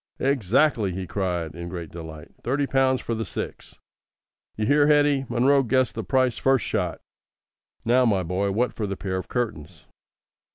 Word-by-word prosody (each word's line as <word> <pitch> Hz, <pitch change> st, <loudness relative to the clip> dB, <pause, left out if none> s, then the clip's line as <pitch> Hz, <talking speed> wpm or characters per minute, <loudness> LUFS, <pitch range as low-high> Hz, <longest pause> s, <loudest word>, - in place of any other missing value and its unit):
"Exactly!" 130 Hz, -3 st, +2 dB
he 95 Hz, +1 st, -4 dB
cried, 90 Hz, -3 st, -2 dB
in 85 Hz, +1 st, -7 dB
great 85 Hz, -3 st, -7 dB
delight; 80 Hz, -2 st, -9 dB
"thirty 140 Hz, +4 st, 0 dB
pounds 135 Hz, -1 st, +2 dB
for 115 Hz, -, -3 dB
the 115 Hz, 0 st, -2 dB
six. -, -, -7 dB, 0.8 s
You 105 Hz, -, 0 dB
hear, 145 Hz, +4 st, +4 dB
Hetty! 145 Hz, -3 st, +3 dB
Munro 135 Hz, +3 st, +4 dB
guessed 130 Hz, 0 st, +1 dB
the 115 Hz, -, -4 dB
price 130 Hz, +4 st, +1 dB
first 135 Hz, -3 st, +2 dB
shot. -, -, -2 dB, 0.9 s
Now, 125 Hz, +2 st, +4 dB
my 100 Hz, -5 st, +2 dB
boy, 90 Hz, +4 st, -1 dB
what 115 Hz, +4 st, 0 dB
for 110 Hz, -2 st, -3 dB
the 100 Hz, -1 st, -4 dB
pair 95 Hz, -2 st, -3 dB
of 95 Hz, -, -5 dB
curtains?" 90 Hz, -, -4 dB
115 Hz, 165 wpm, -24 LUFS, 95-130 Hz, 0.9 s, hear